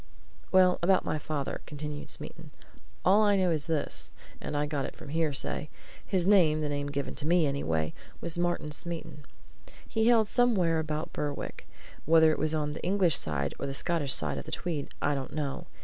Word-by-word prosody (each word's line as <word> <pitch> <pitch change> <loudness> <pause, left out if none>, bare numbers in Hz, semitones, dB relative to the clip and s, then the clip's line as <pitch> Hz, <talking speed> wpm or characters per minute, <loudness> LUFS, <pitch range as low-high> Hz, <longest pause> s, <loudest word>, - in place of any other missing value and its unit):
"Well 185 -1 +5
about 185 +2 +3
my 155 - -1
father," 145 -2 -3
continued 150 0 -6
Smeaton. - - -7 0.6
"All 200 +4 +6
I 205 -2 +4
know 185 -2 +2
is 155 -3 -1
this 160 -3 -2 0.3
and 150 - -3
I 145 - +1
got 145 -2 -2
it - - -7
from - - -11
hearsay: 150 -1 0 0.3
His 185 -2 0
name 165 -7 +5
the 150 - -1
name 145 0 -2
given 140 -2 -3
to 150 - -4
me, 170 -1 +4
anyway 80 - -1 0.3
was 165 - 0
Martin 175 -3 -1
Smeaton. 160 -2 -4 0.6
He 225 -1 0
hailed 230 -2 +5
from - - -9
somewhere 190 -10 +3
about 155 0 -3
Berwick. 145 -1 -4 0.4
Whether 160 0 +6
it - - -2
was 155 0 +1
on 150 -1 -1
the - - -7
English 180 -4 +3
side 70 -2 0
or 140 - -3
the 135 - -3
Scottish 160 -4 0
side 75 -3 -1
of - - -8
the - - -8
Tweed 160 -5 -3
I 145 - +2
don't 135 -2 -4
know. 145 -2 -3
155 Hz, 195 wpm, -29 LUFS, 145-175 Hz, 0.6 s, All